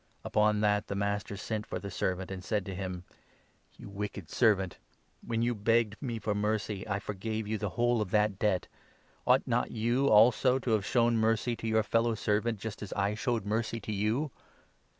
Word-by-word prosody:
Upon 105 0 +2
that 105 -1 +2
the 100 - -3
master 100 0 -2
sent 105 +1 -4
for - - -3
the 100 - -6
servant, 90 +1 -2
32 - - -4
and 95 -1 -7
said 105 -1 -1
to 95 - -5
him 90 -1 -5 0.4
' - - -35
You - - -10
wicked 100 -3 -6
servant! 100 -6 +2 0.5
When 115 0 -1
you 120 +1 +1
begged 110 0 +1
me 120 -4 -3
for 105 -1 -1
mercy, 105 -1 -1
I 100 -2 0
forgave 105 +2 -4
you 110 0 -2
the 105 -1 -2
whole 120 -1 +2
of 105 - -2
that 105 -1 +2
debt. 95 -4 +1 0.6
Ought - - +6
33 - - -6
not - - +1
you, 120 +5 +1
also, 125 +3 +5
to 125 -2 -2
have 105 -4 +1
shown 120 0 +3
mercy 115 +2 +1
to 115 - -5
your 110 0 +3
fellow 115 +2 +1
servant, 105 +2 0
just 110 0 -6
as 100 - -6
I 100 +1 0
showed 115 0 -1
mercy 110 +2 -1
to 110 - -6
you 110 +8 0
105 Hz, 205 wpm, -30 LUFS, 100-115 Hz, 0.6 s, Ought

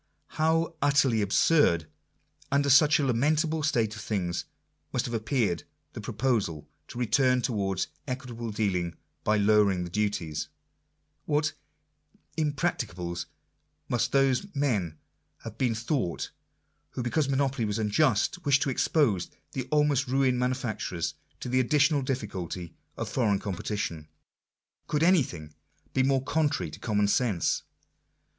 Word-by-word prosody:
How 165 +1 +1
utterly 140 -5 +3
absurd, 100 - +3 0.7
under 140 0 +3
such 150 +3 +6
a 145 - 0
lamentable 155 +6 +1
state 115 -8 +1
of 105 - -7
things, 90 -5 -2 0.5
must - - 0
have 120 - -4
appeared 110 -6 0 0.3
the - - -6
proposal 105 - -1 0.2
to - - -10
return 125 +1 +2
towards 100 -6 0 0.2
equit 130 -1 -4
able 115 0 -5
dealing 90 -6 -1 0.3
by 105 0 +2
lowering 100 -3 +3
the 85 - -7
duties! 90 -7 -1 0.8
What 150 +1 +1 0.4
" - - -37
imprac 155 +2 0
ticables" 90 -5 -4 0.6
must 120 +1 0
those 135 +5 +2
men 105 - 0 0.5
have 115 0 -8
been 120 -4 +1
thought, 115 - -2 0.6
who, 125 - -3
because 140 +4 0
monopoly 135 -3 +1
was 105 0 -1
unjust, 115 - +1
wished 140 -1 +3
to 135 - 0
expose 120 - +1 0.2
the 130 -1 -4
almost 150 -2 +2
ruined 130 -1 +2
manufacturers 125 - -2 0.3
to - - -4
the 130 +1 +2
additional 145 +3 +3
difficulty 95 - -4 0.2
of - - -3
foreign 110 -6 +1
com 100 0 -4
petition! 85 -5 -4 0.8
Gould 150 +1 +1
anything 120 - +2 0.4
be 130 - +2
more 135 0 +2
contrary 150 +1 0
to - - -10
common 105 -3 +1
sense 105 -4 +1
125 Hz, 135 wpm, -28 LUFS, 100-140 Hz, 0.8 s, such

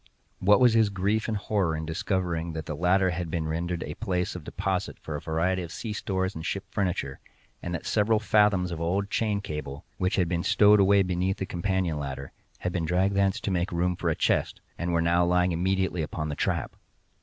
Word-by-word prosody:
What 105 +2 +5
was 125 -3 +5
his 110 -2 +4
grief 100 +3 0
and 110 -2 -1
horror 100 -6 0
in 80 - -4
discovering 85 0 -2
that 80 -1 -5
the 75 - -4
latter 90 +3 +3
had 85 -1 -3
been 80 -1 -2
rendered 85 +2 -2
a 75 - -5
place 90 -3 -2
of 90 - -7
deposit 95 +2 -2
for 80 - -6
a 75 - -4
variety 85 +4 0
of 85 -1 -7
sea 110 +3 -5
stores 95 -2 -2
and 80 - -7
ship 100 +3 -2
furniture, 90 -9 -2 0.4
and 85 0 -3
that 80 - -6
several 110 +1 +2
fathoms 105 -4 +3
of 85 -1 -4
old 95 +4 -1
chain 105 -3 0
cable, 75 -3 -6
which 95 -1 +1
had 90 -3 +2
been 85 -1 -1
stowed 105 +2 +5
away 100 0 +5
beneath 90 +1 -1
the 95 - -3
companion 90 -3 -1
ladder, 70 -1 -5 0.3
had 90 - -1
been 85 -3 -1
dragged 90 +4 +1
thence 100 -1 +2
to 100 - -2
make 90 0 0
room 90 +1 0
for - - -1
a - - +1
chest, - - 0 0.2
and 85 0 -2
were 85 -1 +2
now 85 +1 +3
lying 90 +1 +2
immediately 95 +1 0
upon 75 0 -3
the 75 - -3
trap! - - -1
90 Hz, 215 wpm, -27 LUFS, 85-100 Hz, 0.4 s, What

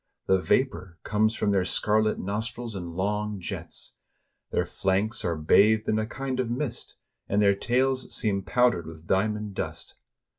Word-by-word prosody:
The 95 - +3
vapor 95 -6 0
comes 110 +2 +1
from 100 - +1
their 95 -2 +3
scarlet 110 +3 +1
nos 105 +4 -2
trils 120 -3 -7
in 85 -3 -6
long 105 +2 -1
jets; 90 - -7 0.5
their - - 0
flanks 100 +5 -1
are 85 -2 0
bathed 105 +8 +4
in 110 - +2
a 110 - -1
kind 135 +1 -4
of 125 -3 0
mist, 120 -1 -4 0.3
and 100 - +2
their 100 -1 +5
tails 130 +5 0
seem 100 -3 0
powdered 120 -6 +2
with 80 0 -11
diamond 105 +2 0
dust. - - -5
105 Hz, 160 wpm, -27 LUFS, 95-115 Hz, 0.5 s, their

